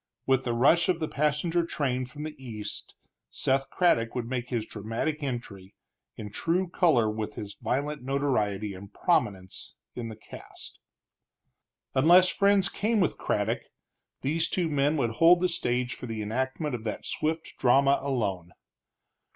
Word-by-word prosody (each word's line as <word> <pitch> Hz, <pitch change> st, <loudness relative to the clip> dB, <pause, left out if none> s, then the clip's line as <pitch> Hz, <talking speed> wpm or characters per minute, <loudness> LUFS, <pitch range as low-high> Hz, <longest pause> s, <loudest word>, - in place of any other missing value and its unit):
With 130 Hz, 0 st, +2 dB
the 120 Hz, -1 st, 0 dB
rush 150 Hz, +9 st, +4 dB
of 175 Hz, -2 st, +2 dB
the 155 Hz, -, -1 dB
passenger 150 Hz, +4 st, +1 dB
train 130 Hz, -6 st, -1 dB
from 145 Hz, +4 st, -9 dB
the 155 Hz, 0 st, -5 dB
east 105 Hz, -4 st, -6 dB, 0.3 s
Seth 135 Hz, +1 st, 0 dB
Craddock 115 Hz, -11 st, +2 dB
would 120 Hz, -2 st, -2 dB
make 125 Hz, -1 st, -3 dB
his 115 Hz, -4 st, -1 dB
dramatic 115 Hz, +10 st, -3 dB
entry, 105 Hz, -8 st, -6 dB, 0.4 s
in 105 Hz, -1 st, -7 dB
true 175 Hz, -, 0 dB
color 160 Hz, -, +3 dB
with 110 Hz, 0 st, -3 dB
his 100 Hz, -1 st, -6 dB
violent 145 Hz, +3 st, -1 dB
notoriety 110 Hz, -7 st, 0 dB
and 100 Hz, +2 st, -11 dB
prominence 95 Hz, -4 st, -1 dB, 0.2 s
in 120 Hz, -2 st, -5 dB
the 110 Hz, -, -7 dB
cast. -, -, -12 dB, 1.1 s
Unless 175 Hz, +7 st, +6 dB
friends 200 Hz, -1 st, +3 dB
came 220 Hz, +2 st, 0 dB
with 180 Hz, -, +1 dB
Craddock, -, -, 0 dB, 0.6 s
these 160 Hz, +4 st, +1 dB
two 175 Hz, -3 st, 0 dB
men 145 Hz, +1 st, +2 dB
would 120 Hz, -5 st, +1 dB
hold 165 Hz, +9 st, +6 dB
the 180 Hz, -, +2 dB
stage 125 Hz, -7 st, -1 dB
for 125 Hz, -, -8 dB
the 110 Hz, -2 st, -4 dB
enactment 130 Hz, +7 st, -2 dB
of 115 Hz, -2 st, -4 dB
that 110 Hz, -, -4 dB
swift 160 Hz, +1 st, -2 dB
drama 135 Hz, +2 st, +4 dB
alone. 100 Hz, -11 st, -2 dB
130 Hz, 150 wpm, -28 LUFS, 115-155 Hz, 1.1 s, Unless